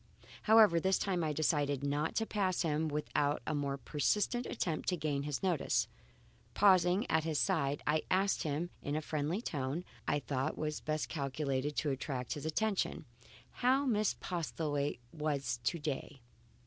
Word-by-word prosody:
However, 215 -6 +7
this 190 +2 +2
time 185 -4 0
I 155 - 0
decided 145 -2 +1
not 145 +2 0
to 225 - +1
pass 190 -5 0
him 160 0 0
without 150 -1 0
a - - -1
more 140 -2 -1
persistent 205 - 0
attempt 165 -9 -2
to 180 - 0
gain 150 -3 -1
his 145 +2 -3
notice. 180 -6 +1 0.7
Pausing 185 +1 +5
at 160 - +2
his 160 -2 -1
side, 145 -6 +1
I 155 +1 +2
asked 195 +2 +2
him 160 +2 -2
in 145 - -2
the 155 - 0
friendly 155 +7 -2
tone 145 - -2 0.2
I - - +2
thought 135 -1 -2 0.3
best 155 0 -1
calculated 140 -1 -2
to 150 - 0
attract 130 -2 -3
his 150 0 -5
attention, 200 -1 0 0.6
how 260 +3 +4
Miss 215 -5 +2
Postlethwaite 150 -6 -2
was 140 -6 -1
to 170 - +1
day. 145 -3 -4
155 Hz, 155 wpm, -34 LUFS, 145-180 Hz, 0.7 s, However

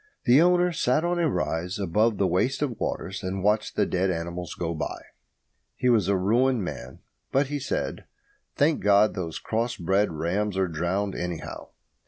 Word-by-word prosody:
The 130 +4 +6
owner 180 0 +4
sat 150 0 +1
on 175 0 0
a 165 -2 +2
rise 90 -2 -2
above 105 +3 +1
the 100 - +2
waste 120 +11 +1
of 125 -6 -3
waters 95 +2 -3
and 95 -1 -3
watched 105 +1 +1
the - - +2
dead 95 +1 0
animals 85 -1 -4
go 85 -1 -2
by. 80 - -4 0.8
He 125 - +1
was 110 -7 +3
a 100 -1 +2
ruined 115 +5 +2
man. 65 -7 -7 0.3
But 135 +1 +2
he 145 0 -2
said, - - -3 0.5
"Thank 150 +2 +2
God, 105 +1 +4
those 85 -4 -4
cross 115 +2 -2
bred 95 +3 +1
rams 90 +6 -1
are 95 -1 +2
drowned, 90 +5 -1
anyhow." 90 -2 -5
100 Hz, 175 wpm, -26 LUFS, 90-125 Hz, 0.8 s, The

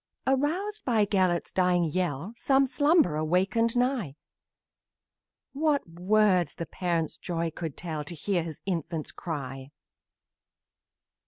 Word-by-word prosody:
Aroused 345 +11 0
by 225 -5 +3
Gelert's 185 -4 +1
dying 180 -1 +2
yell, 170 +2 -2
Some 270 +3 +3
slumberer 285 - +3
wakened 195 +8 +1
nigh; 245 - 0 1.4
What 290 - +1
words 180 -1 +2
the 170 - -4
parent's 170 -3 -2
joy 170 -2 -2
can 160 -2 -5
tell 155 -2 -5
To 170 - -5
hear 180 +3 0
his 160 -2 -7
infant 165 -4 -3
cry! 135 -5 -5
180 Hz, 110 wpm, -28 LUFS, 165-235 Hz, 1.4 s, by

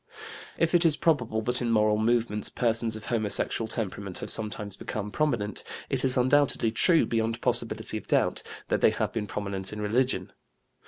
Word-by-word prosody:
If 165 +1 +1
it 175 0 +5
is 160 -3 +4
probable 120 -9 0
that 125 +3 0
in 120 - -1
moral 105 -1 +2
movements 110 -2 +1
persons 115 -1 +1
of 110 - -8
homosexual 110 0 0
temperament 100 -4 -4
have - - -1
sometimes 105 -2 -1
become 105 0 -5
prominent, 120 -9 -1 0.3
it 135 -2 0
is 130 -1 +4
undoubtedly 130 -2 +2
true, 165 +9 +3
beyond 115 0 -1
possibility - - -1
of - - -18
doubt, - - +1 0.3
that - - 0
they - - +6
have - - -2
been 105 -2 -3
prominent 100 -2 -4
in 105 - -7
religion. 120 +5 0
115 Hz, 170 wpm, -27 LUFS, 105-125 Hz, 0.3 s, they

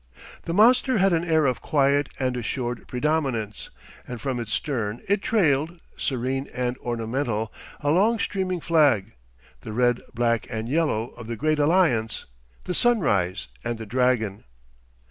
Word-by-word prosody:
The 165 - -2
monster 245 +4 +5
had 195 -1 +3
an 165 0 +1
air 160 -3 +2
of 130 -3 0
quiet 140 -1 +2
and 130 -1 0
assured 120 0 -3
predominance, 125 -6 -1 0.4
and 125 -1 -6
from 130 +1 -2
its 115 -3 -5
stern 115 -7 -2
it 200 +1 +2
trailed, 165 -6 +1 0.2
serene 130 +1 -2
and 125 0 -1
ornamental, 115 -2 -2 0.3
a 145 - +1
long 210 +8 +3
streaming 185 -4 -2
flag, 140 - +3 0.5
the 105 +11 -8
red, 120 +1 +2
black, 115 -1 0
and 110 -2 -4
yellow 135 -6 0
of 115 - -11
the 115 - -3
great 155 +5 0
alliance, 145 -9 +2 0.4
the 180 - -3
Sunrise 110 - +2 0.2
and 120 -1 -2
the 110 - -7
Dragon. 115 -3 0
130 Hz, 145 wpm, -25 LUFS, 115-160 Hz, 0.5 s, monster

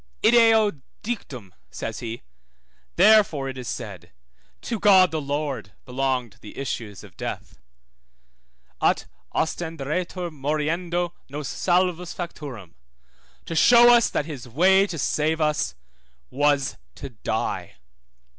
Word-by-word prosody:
Ideo 225 - +5 0.2
dictum, 130 - -6 0.2
says - - -5
he, 115 0 -6 0.7
therefore 195 -8 +5
it 130 - -6
is 125 - -7
said, - - -7 0.5
to 230 -3 -4
God 190 -3 +6
the 160 -1 -2
Lord 140 -6 -3
belonged 130 -3 -2
the 105 - -12
issues 110 -7 -5
of 95 -3 -15
death; - - -6 1.2
ut - - +2 0.3
ostenderetur 165 +2 -2
moriendo 165 +4 -2 0.2
nos 145 0 -5
salvos 180 -1 0
facturum, 140 - -7 0.7
to 165 - -5
show 240 +6 +7
that 210 - -1
his 145 -6 -8
way 190 - +4
to 170 - -5
save 155 +3 0
us 150 - 0 0.6
was 145 0 +1 0.2
to 140 -1 -8
die. 110 - -3
155 Hz, 110 wpm, -24 LUFS, 135-180 Hz, 1.2 s, show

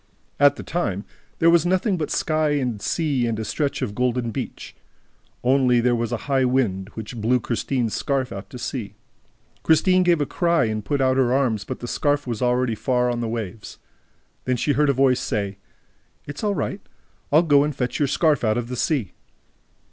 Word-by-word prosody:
At 145 0 +6
that - - -9
time, 110 - -2 0.3
there 165 +1 +5
was 170 -2 +4
nothing 185 +3 +1
but 160 -4 -3
sky 155 -2 +1
and 125 -7 -1
sea 140 -6 0
and 115 -1 -2
a 110 - -4
stretch 140 0 -2
of 110 -5 -3
golden 125 0 -1
beach. - - -6 0.7
Only, 125 -1 +3
there 120 +1 +2
was 115 -1 -2
also 120 - -3
a - - -12
high 135 -2 +2
wind, 110 -7 0
which 110 +1 -7
blew 125 +4 +2
Christine's 120 0 -2
scarf 135 -2 -1
out 100 0 -7
to - - -9
sea. 120 -3 -5 0.7
Christine 185 +3 +4
gave 175 -2 +3
a 145 - +1
cry 170 -2 +1
and 110 -1 -2
put 145 +3 -1
out 130 0 +2
her 125 -2 +3
arms, 125 -6 +1
but 130 - -6
the 120 - -5
scarf 145 +3 0
was 120 -4 -4
already 125 -1 +1
far 125 +2 0
on 120 - -2
the 115 -1 -2
waves. 110 -2 -6 0.7
Then 130 -1 0
she 145 - 0
heard 145 +1 +2
a - - +4
voice 130 -1 +3
say: 100 -2 -3 0.7
"It's 145 +6 -7
all 205 -1 +1
right, 195 - -3 0.5
I'll 155 +4 +5
go 145 -4 +4
and 150 -1 -2
fetch 125 -2 -2
your 145 - +2
scarf 150 0 +2
out 110 0 +2
of 120 0 -3
the 125 - -3
sea." 125 - -1
130 Hz, 200 wpm, -23 LUFS, 115-145 Hz, 0.7 s, At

